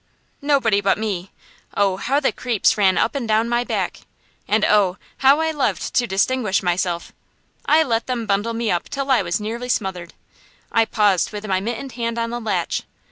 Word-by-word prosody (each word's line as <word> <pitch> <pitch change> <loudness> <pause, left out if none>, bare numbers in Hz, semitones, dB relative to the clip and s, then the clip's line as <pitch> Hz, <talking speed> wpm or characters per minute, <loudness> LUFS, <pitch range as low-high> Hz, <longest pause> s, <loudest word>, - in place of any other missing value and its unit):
Nobody 270 -8 +2
but 195 0 +2
me. 200 -4 -3 0.5
Oh, 195 -2 +2
how 270 +8 +1
the 280 - +1
creeps 240 -5 +1
ran 195 -3 +3
up - - +1
and 270 -5 -3
down 220 +1 +2
my 240 +1 +1
back! - - -2 0.5
and 215 0 +2
oh! 200 -3 +3 0.2
how 275 +3 +5
I 320 0 +1
loved 295 -4 -1
to 240 - +2
distinguish 210 0 +1
myself! 175 -1 -1 0.5
I 315 +1 +5
let 230 -5 -1
them 245 -3 -2
bundle 205 +3 0
me 230 -1 -1
up 175 - -2
till 275 -1 -2
I 260 - +4
was 175 +1 -1
nearly 230 +4 -5
smothered. 180 -6 -2 0.6
I 225 -1 +3
paused 205 -5 +2
with 210 0 -6
my 190 -3 0
mittened 235 +6 -4
hand 235 -1 -3
on 230 0 -2
the 240 - -3
latch. 195 -6 -1
220 Hz, 190 wpm, -21 LUFS, 195-245 Hz, 0.6 s, how